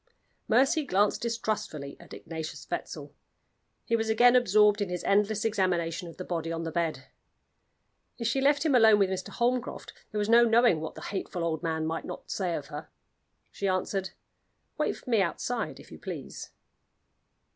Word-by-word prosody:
Mercy 270 +7 +3
glanced 205 -5 +1
distrustfully 215 -11 -3
at - - -16
Ignatius 160 -1 -7
Wetzel. - - -5 0.7
He 230 - +1
was 225 -1 -1
again 240 +3 +6
absorbed 210 -3 +4
in 200 - -1
his 180 -1 -4
endless 210 +2 +2
examination 180 -5 0
of 165 - -11
the 185 - -5
body 165 -2 -3
on 165 0 -3
the 165 - -4
bed. 160 -5 -2 1.1
If 230 - -4
she 230 +4 +1
left 285 +3 +3
him 305 - +3
alone 220 -4 +7
with 195 -2 +2
Mr. 185 -1 -3
Holmcroft, 245 0 -2 0.2
there 215 - -5
was 205 0 0
no 235 +1 +7
knowing 230 -7 +4
what 160 - -6
the - - -9
hateful 185 -3 -4
old 160 -2 -1
man 160 -2 -1
might 165 +1 -3
not - - -8
say 180 -4 -1
of 145 - -5
her. 150 +1 -7 0.6
She 200 - -3
answered: 190 0 -1 0.7
"Wait - - 0
for - - -18
me 230 -4 +3
outside, 225 +6 -2
if - - -15
you - - -10
please." - - -7
200 Hz, 175 wpm, -28 LUFS, 170-230 Hz, 1.1 s, alone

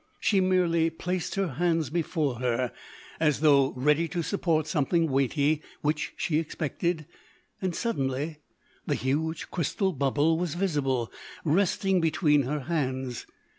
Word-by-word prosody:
She 200 - +3
merely 175 -3 +3
placed 180 +2 -3
her 195 -1 +1
hands 165 -1 0
before 155 -6 -1
her 125 0 0 0.5
as 150 -2 +2
though 140 -3 +5
ready 150 +6 +2
to 170 +1 -2
support 165 -4 0
something 160 +1 +1
weighty 140 +3 +2 0.2
which 150 0 -1
she 155 -2 +1
expected 160 +1 -2 0.6
and—suddenly, 155 - -1 0.5
the - - +1
huge 155 +5 -2
crystal 190 +3 0
bubble 145 +3 +2
was 175 -3 -2
visible, 140 - 0 0.3
resting 190 +3 +2
between 155 -2 +3
her 145 +3 -2
hands. 130 -5 -2
155 Hz, 125 wpm, -27 LUFS, 140-170 Hz, 0.6 s, though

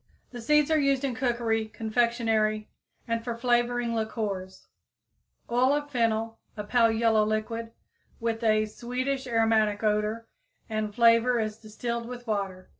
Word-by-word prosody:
The 245 -2 -7
seeds 300 +5 +3
are 315 - +4
used 275 -1 +2
in 270 -2 0
cookery, 235 -3 0
confectionery 220 -1 0 0.4
and 230 0 -1
for 235 -1 -4
flavoring 240 0 +1
liquors. 205 -4 -4 0.8
Oil 250 +3 +3
of 290 0 -2
fennel, 225 -2 0 0.2
a 210 - -3
pale 230 +2 +3
yellow 225 -1 +3
liquid, 220 +2 -2 0.5
with 230 0 -2
a 215 -1 +3
sweetish 255 +4 -3
aromatic 225 -3 +2
odor 215 +2 0 0.4
and 215 -1 -2
flavor, 235 +1 +5
is 215 -1 -2
distilled 235 +2 -4
with 245 0 -8
water. 195 -4 -3
230 Hz, 135 wpm, -27 LUFS, 215-245 Hz, 0.8 s, flavor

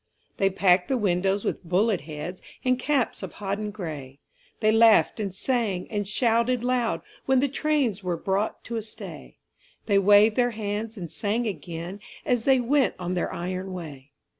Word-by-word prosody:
They 195 - +3
packed 185 -1 +3
the 265 - +1
windows 195 -1 +1
with - - -2
bullet 185 +3 +1
heads 155 +4 -7 0.2
And 255 0 +2
caps 270 -2 0
of - - -6
hodden 205 +1 -3
gray; 155 -10 -7 0.4
They 215 -1 +3
laughed 225 0 +5
and 200 -3 -2
sang 205 -2 -1
and 205 -2 -2
shouted 235 +2 +2
loud 245 -2 0 0.3
When 265 -1 +4
the 280 - +2
trains 275 -7 0
were 180 -3 -2
brought 195 +5 -1
to 235 - -4
a - - -1
stay; 215 0 -10 0.5
They 200 -2 +4
waved 205 +2 +6
their 245 -1 +4
hands 215 +1 -3
and 170 -5 -6
sang 205 +9 -1
again 175 0 -5 0.3
As 245 -3 +1
they 265 -1 +5
went 255 -1 +2
on 180 0 -3
their 180 - -1
iron 185 +2 -4
way. 150 -6 -8
205 Hz, 170 wpm, -26 LUFS, 180-235 Hz, 0.5 s, waved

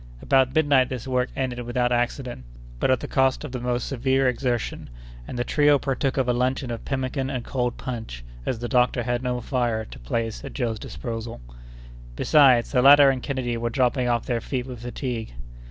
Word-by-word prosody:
About 130 - +2
midnight 145 -5 +4
this 130 -1 -5
work 125 -1 0
ended 125 -2 -2
without 120 0 0
accident, 120 - -2 0.4
but - - +1
at 130 -2 +2
the - - -5
cost 130 -1 +1
of 125 -1 -5
most 125 -1 -1
severe 135 0 +1
exertion, 125 - -2 0.4
and - - -6
the 120 - 0
trio 145 +3 +4
partook 135 0 -1
of 130 -2 +1
a 125 - +3
luncheon 130 +1 -1
of 115 - -5
pemmican 135 0 -2
and 125 -3 -4
cold 125 -2 -2
punch, 110 - -6 0.2
as 125 - -2
the 120 +2 -4
doctor 125 -1 +2
had 120 +1 -1
no 125 -1 -1
more 125 -1 -4
fire 120 -4 -1
to - - -12
place 115 - -3
at - - -7
Joe's 115 -5 -2
disposal. 115 - -6 0.8
Besides, 130 - +4
the 125 - +3
latter 140 +1 +8
and 130 -1 -3
Kennedy 125 -4 -2
were 120 0 -2
dropping 125 0 +1
off 120 -1 0
their 120 -2 -1
feet 125 +1 -3
with 125 -3 -8
fatigue. 120 - -4
125 Hz, 195 wpm, -24 LUFS, 120-130 Hz, 0.8 s, latter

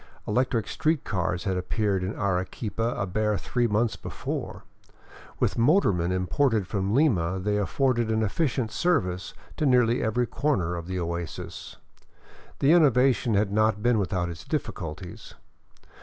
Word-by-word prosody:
Electric 120 0 0
street 155 -2 0
cars 90 -2 -2
had 95 -3 -1
appeared 95 +1 -1
in 95 +3 -3
Arequipa 105 +4 -2
a - - -1
bare 105 +2 0
three 120 +3 0
months 110 +1 +1
before; - - -5 0.8
with - - 0
motormen 115 - +3
imported 105 +4 +1
from 100 +2 -1
Lima 95 - +2
they 105 +2 0
afforded 120 +2 +1
an 110 0 +1
efficient 120 0 -1
service 95 - 0 0.2
to 155 - 0
nearly 125 -2 +3
every 120 +3 +1
corner 105 - -1
of 85 0 -6
the 90 0 -3
oasis. 85 -1 -5 0.8
The 140 - +3
innovation 130 -8 +4
had 100 0 +1
not 110 0 +1
been 120 -2 +3
without 90 -2 -1
its 85 -3 -7
difficulties. 85 +3 -5
105 Hz, 140 wpm, -26 LUFS, 95-125 Hz, 0.8 s, innovation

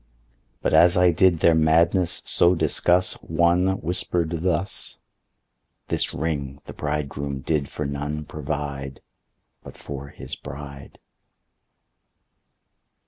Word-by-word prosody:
But - - 0
as 90 +1 +6
I 90 0 +5
did 85 -1 +3
their 85 - +5
madness 85 +3 +2
so 90 +1 +4
discuss 90 +2 +2
One 85 +2 +2
whisper'd 85 -1 -1
thus, 90 +2 0 0.9
"This - - +1
Ring 70 -3 -3
the - - -9
Bridegroom 70 -2 -3
did 75 -1 -1
for 75 - -4
none 75 +2 -4
provide 70 -2 -5 0.6
But - - -12
for 70 -1 -7
his - - -8
bride." 70 0 -10
75 Hz, 105 wpm, -24 LUFS, 70-85 Hz, 0.9 s, as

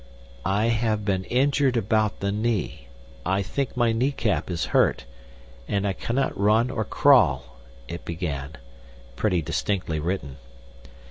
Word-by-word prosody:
"I 105 +4 +2
have 110 -2 0
been 95 -2 0
injured 135 0 +2
about 110 0 +1
the 100 0 0
knee, 110 0 -2 0.4
I 95 +3 0
think 130 +6 -3
my 120 -2 +3
kneecap 115 -4 0
is 85 -3 -1
hurt, - - +3 0.6
and 100 0 0
I 95 - 0
cannot 125 +7 -1
run 110 +5 +3
or 110 -4 -1
crawl," 90 - +3 0.3
it 85 - -7
began—pretty - - -4
distinctly 80 +3 -1
written. 75 -5 -3
100 Hz, 125 wpm, -25 LUFS, 80-115 Hz, 0.6 s, my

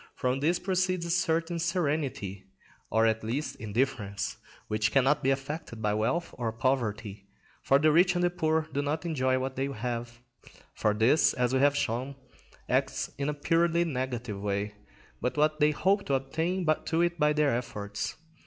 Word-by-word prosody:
From 130 +1 0
this 165 +5 +2
proceeds 185 -2 0
a 170 - -2
certain 170 -1 +1
serenity, 145 - -1 0.4
or 110 0 +3
at 110 0 +1
least 125 +8 -2
indifference, 110 -3 -2 0.3
which 110 0 0
cannot 135 +2 +3
be 135 - +1
affected 135 -2 -3
by 105 -1 0
wealth 115 +11 -1
or 115 -2 -1
poverty; 110 -4 -2 0.3
for 135 - +4
the 155 +2 +4
rich 180 +3 +4
and 175 - +1
the 175 - +3
poor 160 -3 0
do 140 - 0
not 150 +4 -2
enjoy 130 -6 +1
what 130 0 -3
they 135 +1 -1
have, 120 -2 -4 0.6
for 105 -1 +1
this, 115 +8 +4
as 125 0 +1
we 130 - +3
have 145 +1 +4
shown, 130 +4 -2 0.5
acts - - 0
in 140 +1 0
a - - 0
purely 170 +3 +2
negative 125 -8 -3
way, 100 +1 -2 0.5
but 125 - -1
what 155 +1 +2
they 150 0 +5
hope 195 +7 +2
to 140 - +2
attain 160 +7 -1 0.2
to 170 +1 +3
by 150 0 +4
their 150 -4 +2
efforts. 105 -4 -4
135 Hz, 170 wpm, -29 LUFS, 115-160 Hz, 0.6 s, they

